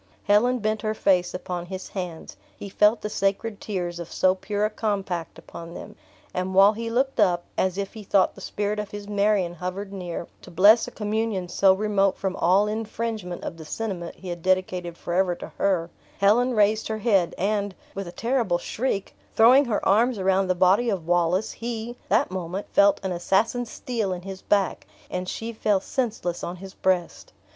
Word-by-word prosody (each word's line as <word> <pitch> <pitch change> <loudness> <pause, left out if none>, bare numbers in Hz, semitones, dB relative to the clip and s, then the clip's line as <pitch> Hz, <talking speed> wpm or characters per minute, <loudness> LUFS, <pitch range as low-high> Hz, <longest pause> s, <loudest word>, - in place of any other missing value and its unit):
Helen 240 +5 +3
bent 215 -1 -1
her 215 0 -1
face 180 -4 +2
upon 180 -1 -5
his 190 0 -7
hands; 180 -4 -6 0.2
he 200 - -7
felt 210 +3 +3
the - - -3
sacred 200 +2 -1
tears 175 -4 -3
of 170 - -7
so 185 0 +3
pure 205 +2 -2
a - - +1
compact 195 -6 -3
upon 170 +1 -10
them; - - -9 0.4
and 185 +1 -2
while 200 +2 +7
he 230 +1 -4
looked 260 +2 0
up, 180 -4 +3
as 190 0 0
if 200 -1 -3
he 220 - -8
thought 195 -1 +2
the - - -13
spirit 210 0 -2
of 210 -1 -4
his 205 0 -8
Marion 200 -3 +1
hovered 185 +3 -5
near, 175 -3 -5 0.2
to - - -12
bless 205 +6 +6
a - - -7
communion 210 -3 -2
so 195 +2 +4
remote 195 -1 +1
from 190 -1 -2
all 190 +4 +4
infringement 215 -3 -4
of 165 - -5
the 160 - -9
sentiment 180 0 -4
he 185 - -9
had 175 -1 -5
dedicated 185 -1 0
forever 180 0 0
to - - -9
her, 175 -4 +1 0.3
Helen 235 +5 +3
raised 215 +1 +3
her 220 - -2
head 200 -6 +2
and, 200 0 -1 0.2
with 195 -2 -5
a - - -6
terrible 230 -5 0
shriek, 205 +2 -3 0.2
throwing 255 +6 +7
her 225 -4 -1
arms 230 +5 +3
around 190 0 +2
the 185 - +1
body 190 +7 +4
of 190 -6 -2
Wallace, 175 +3 +1
he, 235 0 -5
that - - +2
moment, 185 +1 -4
felt 200 0 +5
an 190 - -2
assassin's 215 +7 0
steel 220 -7 -2
in 180 -1 -7
his 195 0 -7
back, 200 -2 0 0.2
and 180 0 -3
she 230 +1 -5
fell 210 -2 +1
senseless 210 -6 -3
on 175 - -4
his 190 +1 -10
breast. 180 -2 -1
195 Hz, 190 wpm, -25 LUFS, 180-215 Hz, 0.4 s, while